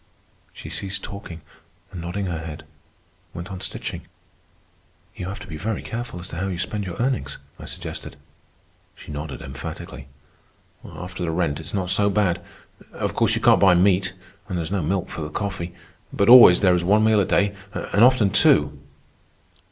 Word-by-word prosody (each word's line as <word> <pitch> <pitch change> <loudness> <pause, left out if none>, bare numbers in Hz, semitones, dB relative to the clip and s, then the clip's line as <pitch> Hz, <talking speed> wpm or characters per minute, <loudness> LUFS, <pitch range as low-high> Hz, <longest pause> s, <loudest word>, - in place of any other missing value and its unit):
She - - -10
ceased 100 0 -5
talking, 100 -5 -8 0.5
and, 90 -4 -7
nodding 90 +4 -3
her 85 -3 -3
head, 80 -2 -8 0.7
went 85 +3 -7
on 95 -1 -7
stitching. - - -5 1.1
"You 90 - -6
have 100 +3 -6
to - - -8
be 80 -4 -7
very 105 +7 -3
careful 115 -6 -5
as 90 - -7
to 85 - -7
how 95 +3 -2
you 95 -3 -3
spend 100 +3 -3
your 90 - -5
earnings," 75 - -1 0.2
I - - -9
suggested. - - -7 0.8
She - - -11
nodded 75 0 -6
emphatically. 65 +1 -8 0.8
"After 90 0 -7
the 85 - -1
rent 80 -3 -1
it's 80 +4 -5
not 95 -2 -1
so 100 +2 +2
bad. 95 -4 +1 0.5
Of - - -3
course - - +2
you - - -2
can't - - +5
buy 95 -3 +6
meat. 95 +1 +3 0.4
And 90 - -2
there 85 - -1
is 80 - -6
no 100 -2 0
milk 90 +4 -1
for - - -6
the 75 - -4
coffee. 90 -1 -4 0.4
But 100 - +1
always 120 -8 +10
there 95 -3 +5
is 90 -1 +1
one 105 +4 +4
meal 110 -1 +4
a - - +1
day, 100 +2 +1 0.2
and 105 0 +1
often 120 -6 +5
two." 75 -6 +4
90 Hz, 185 wpm, -23 LUFS, 85-100 Hz, 1.1 s, always